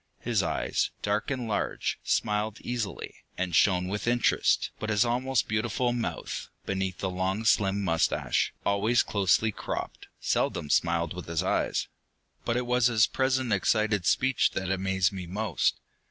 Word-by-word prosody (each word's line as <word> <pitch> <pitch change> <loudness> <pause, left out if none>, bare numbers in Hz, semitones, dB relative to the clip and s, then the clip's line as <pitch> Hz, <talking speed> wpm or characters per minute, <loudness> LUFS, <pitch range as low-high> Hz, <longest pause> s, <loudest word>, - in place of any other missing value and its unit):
His - - +1
eyes, - - 0
dark 105 +1 0
and 130 -4 -2
large, 105 -2 -2
smiled 105 +1 0
easily, 120 -4 -4 0.2
and 90 -2 -1
shone 90 +2 +3
with 105 +3 -3
interest, 120 0 +2
but 110 - -3
his 105 +2 +3
almost 125 +1 0
beautiful 120 +3 0
mouth, 120 -2 -4 0.2
beneath 95 -2 -2
the 95 - -2
long 95 +4 -2
slim 100 -1 +2
mustache, 80 -3 +1
always 105 +4 +3
closely 100 +2 +2
cropped, - - -5
seldom 75 - -1
smiled 85 -1 +1
with 90 -2 -8
his 85 -1 -1
eyes. - - 0 0.6
But 115 - 0
it 125 - -1
was 125 0 +3
his 110 -3 +4
present 130 -2 0
excited 105 0 +1
speech 130 -1 +2
that 95 -1 -2
amazed 95 -1 +1
me 90 -2 -6
most. 100 -1 0
105 Hz, 150 wpm, -28 LUFS, 95-120 Hz, 0.6 s, his